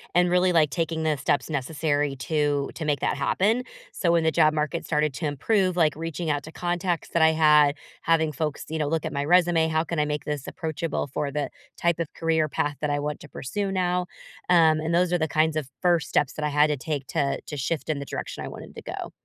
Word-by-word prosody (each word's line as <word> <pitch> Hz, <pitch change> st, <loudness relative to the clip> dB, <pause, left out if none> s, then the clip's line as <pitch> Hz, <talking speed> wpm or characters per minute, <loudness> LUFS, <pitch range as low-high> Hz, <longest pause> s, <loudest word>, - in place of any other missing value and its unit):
and 180 Hz, 0 st, +4 dB
really, 180 Hz, 0 st, +3 dB
like, 155 Hz, -3 st, +4 dB
taking 160 Hz, +3 st, -2 dB
the 155 Hz, -2 st, +1 dB
steps 145 Hz, -, 0 dB
necessary 145 Hz, 0 st, -1 dB
to 145 Hz, -1 st, 0 dB
to 160 Hz, -, -5 dB
make 145 Hz, -2 st, 0 dB
that 145 Hz, -, 0 dB
happen. 210 Hz, -, +1 dB, 0.3 s
So 170 Hz, -, +1 dB
when 170 Hz, -1 st, +3 dB
the 160 Hz, -, +3 dB
job 155 Hz, -1 st, +4 dB
market 155 Hz, +2 st, -2 dB
started 150 Hz, -2 st, +1 dB
to 160 Hz, -, -3 dB
improve, 185 Hz, -, +1 dB
like, 160 Hz, -4 st, +3 dB
reaching 165 Hz, 0 st, -4 dB
out 145 Hz, -1 st, 0 dB
to 160 Hz, -, -11 dB
contacts 175 Hz, -1 st, -2 dB
that 170 Hz, -, +1 dB
I 160 Hz, 0 st, +6 dB
had, 150 Hz, -2 st, +5 dB, 0.3 s
having 160 Hz, -2 st, +2 dB
folks, 150 Hz, 0 st, -3 dB
you 160 Hz, 0 st, -3 dB
know, 150 Hz, -, 0 dB
look 160 Hz, 0 st, -1 dB
at -, -, -3 dB
my 140 Hz, -1 st, -2 dB
resume, 175 Hz, -1 st, +4 dB
"How 160 Hz, 0 st, +1 dB
can 165 Hz, -1 st, -3 dB
I 150 Hz, -, +2 dB
make 150 Hz, -2 st, -3 dB
this 150 Hz, -3 st, -4 dB
approachable 160 Hz, 0 st, -3 dB
for 140 Hz, +1 st, -3 dB
the 145 Hz, 0 st, -2 dB, 0.3 s
type 170 Hz, -1 st, +1 dB
of 165 Hz, -, -3 dB
career 160 Hz, -1 st, +1 dB
path 145 Hz, 0 st, -2 dB
that 150 Hz, -, -1 dB
I 145 Hz, 0 st, 0 dB
want 150 Hz, 0 st, -3 dB
to -, -, -10 dB
pursue 195 Hz, +9 st, -3 dB
now?" 180 Hz, -1 st, 0 dB, 0.4 s
Um, 160 Hz, -3 st, +5 dB
and 160 Hz, +2 st, -1 dB
those 180 Hz, 0 st, +2 dB
are 175 Hz, -, +3 dB
the 160 Hz, -, 0 dB
kinds 155 Hz, 0 st, +1 dB
of 150 Hz, -4 st, -2 dB
1st 175 Hz, -3 st, +2 dB
steps 145 Hz, -, +1 dB
that 155 Hz, -, -3 dB
I 150 Hz, -, +1 dB
had 150 Hz, +1 st, +4 dB
to 150 Hz, -, -1 dB
take 145 Hz, -1 st, -4 dB
to 140 Hz, -1 st, -1 dB
to 150 Hz, -, -6 dB
shift 150 Hz, +4 st, -2 dB
in 150 Hz, -2 st, 0 dB
the 140 Hz, -, -5 dB
direction -, -, -5 dB
I -, -, -5 dB
wanted -, -, -10 dB
to -, -, -8 dB
go. -, -, -6 dB
155 Hz, 245 wpm, -25 LUFS, 150-170 Hz, 0.4 s, I